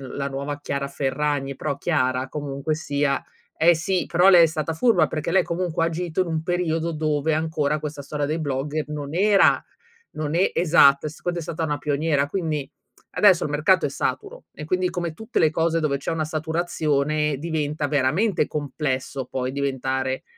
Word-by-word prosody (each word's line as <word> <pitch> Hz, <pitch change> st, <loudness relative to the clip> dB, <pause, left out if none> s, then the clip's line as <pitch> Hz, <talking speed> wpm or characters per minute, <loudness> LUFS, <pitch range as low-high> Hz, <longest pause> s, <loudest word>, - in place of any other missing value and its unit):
la 140 Hz, 0 st, -2 dB
nuova 140 Hz, +1 st, -4 dB
Chiara 140 Hz, -1 st, -3 dB
Ferragni, 140 Hz, 0 st, -1 dB
però 140 Hz, -, -3 dB
Chiara 130 Hz, -6 st, 0 dB
comunque 145 Hz, +1 st, -3 dB
sia 145 Hz, -3 st, -1 dB, 0.3 s
eh 170 Hz, +1 st, +5 dB
sì, 180 Hz, +3 st, -1 dB
però 180 Hz, +3 st, +5 dB
lei 175 Hz, -3 st, +8 dB
è -, -, +8 dB
stata 160 Hz, 0 st, -3 dB
furba, 220 Hz, +2 st, +3 dB
perché 155 Hz, +2 st, -3 dB
lei 190 Hz, -1 st, +4 dB
comunque 170 Hz, -1 st, -1 dB
ha -, -, +3 dB
agito 170 Hz, +1 st, -2 dB
in 180 Hz, -, -1 dB
un 160 Hz, -1 st, -1 dB
periodo 170 Hz, -2 st, -1 dB
dove 155 Hz, 0 st, 0 dB
ancora 155 Hz, -2 st, 0 dB
questa 150 Hz, -1 st, -6 dB
storia 145 Hz, +1 st, -3 dB
dei 155 Hz, +3 st, -2 dB
blogger 145 Hz, +1 st, -2 dB
non 145 Hz, 0 st, -5 dB
era 200 Hz, +1 st, +4 dB, 0.5 s
non 155 Hz, +1 st, -3 dB
e 185 Hz, -, +2 dB
esatto, 150 Hz, -5 st, +5 dB
e 155 Hz, -, -1 dB
secondo 175 Hz, +3 st, -4 dB
è -, -, -4 dB
stata 160 Hz, +1 st, -4 dB
una 150 Hz, -2 st, -1 dB
pioniera, 145 Hz, 0 st, 0 dB
quindi 155 Hz, -4 st, -3 dB, 0.4 s
adesso 190 Hz, -4 st, +4 dB
il -, -, -3 dB
mercato 165 Hz, +6 st, +3 dB
è -, -, -1 dB
saturo -, -, -4 dB
e 150 Hz, -, -8 dB
quindi 185 Hz, +2 st, 0 dB
come 175 Hz, -3 st, -3 dB
tutte 220 Hz, +8 st, -3 dB
le 155 Hz, -2 st, +4 dB
cose 165 Hz, +1 st, +1 dB
dove 145 Hz, -3 st, 0 dB
c'è 135 Hz, -, -4 dB
una 160 Hz, -1 st, -1 dB
saturazione, 155 Hz, -2 st, -1 dB
diventa 150 Hz, -1 st, -2 dB
veramente 150 Hz, +7 st, +1 dB
complesso 140 Hz, -2 st, -3 dB
poi 130 Hz, 0 st, -3 dB
diventare 130 Hz, -1 st, -2 dB
155 Hz, 180 wpm, -23 LUFS, 140-165 Hz, 0.5 s, lei